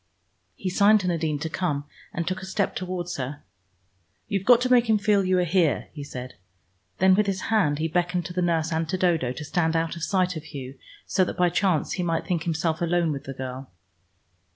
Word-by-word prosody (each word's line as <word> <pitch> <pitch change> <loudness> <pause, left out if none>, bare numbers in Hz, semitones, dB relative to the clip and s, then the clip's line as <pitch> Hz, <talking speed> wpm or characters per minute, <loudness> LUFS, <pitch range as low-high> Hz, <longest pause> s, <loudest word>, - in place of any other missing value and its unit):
He 185 - -3
signed 205 +3 +5
to 185 - -3
Nadine 160 -4 0
to 150 - -3
come, 155 -4 -2 0.3
and 170 0 -3
took 185 +1 -2
a - - -6
step 195 +1 -1
towards 180 -1 -4
her. 140 +2 -5 0.8
"You've 195 -1 -2
got 245 -2 +8
to 255 0 0
make 240 -2 +5
him 220 - +5
feel 205 -1 +2
you 185 0 +2
are 180 - +3
here," 175 -3 +1
he 145 - -7
said. 130 -2 -7 0.6
Then 190 +1 +5
with 210 +2 +3
his 190 -1 -1
hand 150 -10 +3
he 160 +2 0
beckoned 175 +1 0
to 175 - -6
the 180 - -1
nurse 165 -2 +1
and 160 0 -1
to 185 - 0
Dodo, 165 -9 +1
to 150 +4 -6
stand 160 +1 0
out 165 0 0
of 170 - -8
sight 185 0 +1
of 155 0 -7
Hugh, 135 -3 -8 0.3
so 190 - +2
that - - -5
by 180 0 +4
chance 180 -4 +1
he 185 - -2
might 165 -2 -1
think 170 -4 -1
himself 160 -1 -1
alone 170 -1 +1
with 140 -2 -5
the 135 - -5
girl. 130 0 -6
175 Hz, 225 wpm, -25 LUFS, 155-185 Hz, 0.8 s, got